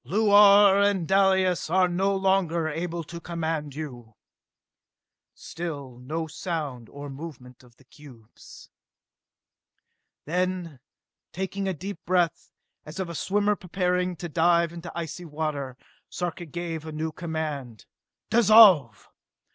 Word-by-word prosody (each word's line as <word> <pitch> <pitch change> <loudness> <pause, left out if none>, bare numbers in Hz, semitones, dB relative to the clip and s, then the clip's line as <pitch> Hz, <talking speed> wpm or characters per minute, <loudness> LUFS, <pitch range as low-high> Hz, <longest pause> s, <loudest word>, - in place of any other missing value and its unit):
"Luar 205 -1 +6
and 200 -5 +1
Dalis 190 -3 +2
are 185 +2 +3
no 190 +3 0
longer 190 -4 +1
able 165 +2 -4
to 170 +2 -9
command 160 -4 -4
you!" 120 -8 -8 1.2
Still 145 -7 -7
no 155 +6 -4
sound 150 - -5
or 145 0 -9
movement 135 -3 -10
of 120 -2 -21
the 135 - -23
cubes. 125 -5 -16 1.5
Then, 180 -3 -2 0.5
taking 190 +1 -4
a 190 - 0
deep 180 +1 -7
breath, 175 -2 0 0.3
as 155 +4 -9
of 185 -2 -3
a - - -6
swimmer 205 +4 0
preparing 180 -1 -1
to 175 - -6
dive 170 +1 +2
into 170 0 -8
icy 170 +1 -6
water, 145 -4 -4 0.3
Sarka 175 0 -4
gave 165 0 -5
a 160 - -7
new 155 +1 -3
command. 155 - -5 0.5
"Dissolve! 205 - +6
170 Hz, 120 wpm, -26 LUFS, 150-185 Hz, 1.5 s, Luar